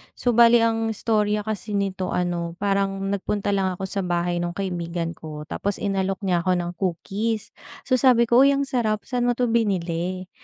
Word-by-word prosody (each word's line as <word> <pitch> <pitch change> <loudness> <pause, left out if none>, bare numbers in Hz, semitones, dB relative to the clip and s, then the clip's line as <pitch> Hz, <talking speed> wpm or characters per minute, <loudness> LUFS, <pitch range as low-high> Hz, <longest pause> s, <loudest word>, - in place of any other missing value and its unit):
So, 245 - -1
bale 235 0 +7
ang 225 0 +1
istorya 210 -1 +1
kasi 215 -1 -4
nito 190 -2 -1
ano, 175 -1 -1
parang 195 -1 0
nagpunta 200 +1 -2
lang 190 -2 +1
ako 195 - -6
sa 195 - -2
bahay 175 0 0
nung 175 0 -2
kaibigan 170 -3 -3
ko 155 -1 -8
tapos 200 0 -2
inalok 195 -1 -1
niya 180 -2 +2
ako 185 - +3
ng 175 0 -3
cookies. 200 +4 -2 0.4
So, 255 - +2
sabi 245 -3 +5
ko, 240 +2 +6
"Uy, 280 - +5
ang 280 - 0
sarap, 220 -5 0
saan 245 -2 0
mo - - +3
to 245 -2 +1
binili?" 185 -4 -1
195 Hz, 185 wpm, -23 LUFS, 180-225 Hz, 0.4 s, bale